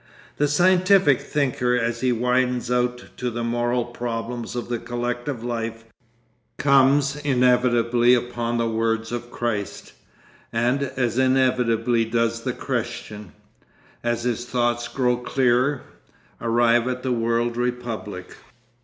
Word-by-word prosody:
The 145 - +2
scientific 180 -1 +4
thinker 130 -4 0
as 115 -1 -1
he 130 -1 +2
widens 125 +1 0
out 125 0 0
to 125 -1 -2
the 120 0 -4
moral 120 +1 0
problems 120 0 -5
of 120 - -4
the 120 -1 -2
collective 120 +1 -4
life, 115 -1 -4 0.7
comes 140 +1 +3
inevitably 125 -3 +3
upon 120 -1 -2
the 115 0 0
words 115 0 -1
of 120 0 -5
Christ, 115 -5 -4 0.6
and 120 +4 +1
as 130 -3 -1
inevitably 125 -3 +2
does 115 0 0
the - - -2
Christian, 105 -4 -5 0.7
as 120 0 -1
his 120 -1 -1
thought 120 -1 -1
grows 125 -2 +1
clearer, 130 +2 +1 0.6
arrive 120 +1 +3
at 125 0 -3
the 130 - -1
world 115 0 0
republic. 120 -6 -4
120 Hz, 120 wpm, -23 LUFS, 115-125 Hz, 0.7 s, scientific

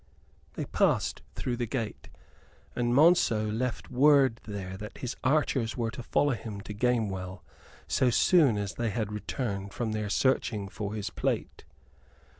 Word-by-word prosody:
They - - -4
passed - - +1
through 120 -2 -2
the 120 -1 -2
gate, 115 -2 -4 0.7
and 120 -1 0
Monceux 125 -7 +4
left 120 +4 -3
word 135 -2 +4
there 95 -3 -5
that 105 +2 -8
his 125 - -4
archers 130 -4 +1
were 115 -2 -1
to 125 +2 -7
follow 145 +3 +1
him 110 -3 -6
to 105 - -7
Gamewell 100 -5 -1 0.4
so 130 - +2
soon 140 - +4
as 100 -2 -3
they 120 -1 -1
had 110 -1 -2
returned 100 -2 -4
from 115 -3 -2
their 105 -1 -2
searching 110 -4 +1
for 105 +1 -5
his 105 -2 -4
plate. - - -2
115 Hz, 150 wpm, -29 LUFS, 105-125 Hz, 0.7 s, Monceux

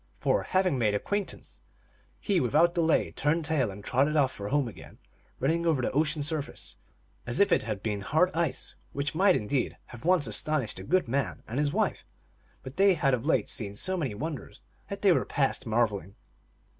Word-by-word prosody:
For, - - +2
having 185 -7 +1
made 105 -3 +2
acquaintance, 205 - -4 0.6
he 200 -4 +1
without 155 +7 +3
delay 165 -2 +2
turned 155 +2 0
tail 145 -7 +1
and 100 +1 -9
trotted 140 +7 +1
off 140 -4 +3
for 100 -4 -7
home 145 -2 +1
again, 115 - -11 0.4
running 165 +6 +1
over 160 -5 +2
the 125 - -1
ocean 150 +1 +1
surface 150 -1 -4 0.5
as 120 - -1
if 200 - +4
it - - +4
had 105 -3 -4
been 105 -2 -2
hard 160 - +2
ice; 170 0 -1 0.2
which 140 +1 -2
might, 190 +3 +4
indeed, 125 +5 -1 0.2
have 120 - -10
once 175 -3 +3
astonished 125 +1 -1
the 95 - -7
good 185 - +2
man 135 +3 -2
and 120 +5 -3
his 145 -1 +1
wife, - - 0 0.6
but 130 +3 -9
they 195 -1 +5
had 140 -4 +2
of 125 +3 -1
late - - +3
days - - -7
seen 100 -5 -4
so 185 - -1
many 140 - -2
wonders 150 +3 -6 0.3
that 200 0 -6
they 195 - +6
were - - +3
past 135 -2 -1
marveling. 105 -4 0
145 Hz, 195 wpm, -28 LUFS, 120-165 Hz, 0.6 s, they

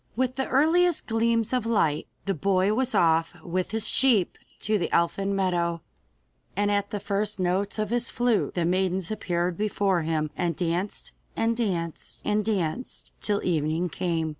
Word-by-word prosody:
With 255 +1 0
the 265 - -1
earliest 330 +5 +3
gleams 230 0 +1
of 250 -3 +1
light, 180 -10 +1 0.2
the 195 - 0
boy 190 +3 +2
was 260 +3 0
off 165 -1 +3
with 180 +1 -2
his 225 -1 -2
sheep 235 -9 +3 0.3
to 215 0 +1
the 170 - -2
elfin 195 +4 +1
meadow, 175 -3 0 0.7
and 205 +1 +1
at 200 0 0
the 205 - -3
first 205 +1 -1
notes 185 +3 0
of 215 0 -2
his 240 0 +1
flute 240 -3 +1
the 175 -2 +1
maidens 185 +1 0
appeared 175 -4 -1
before 200 -3 +1
him 155 -1 -1
and 170 -2 -1
danced 175 +4 -2 0.2
and 230 +1 +1
danced 175 -8 -3
and 210 0 +1
danced 205 +2 -3
till 205 -1 0
evening 160 +1 0
came. 165 -1 -1
195 Hz, 165 wpm, -26 LUFS, 170-220 Hz, 0.7 s, earliest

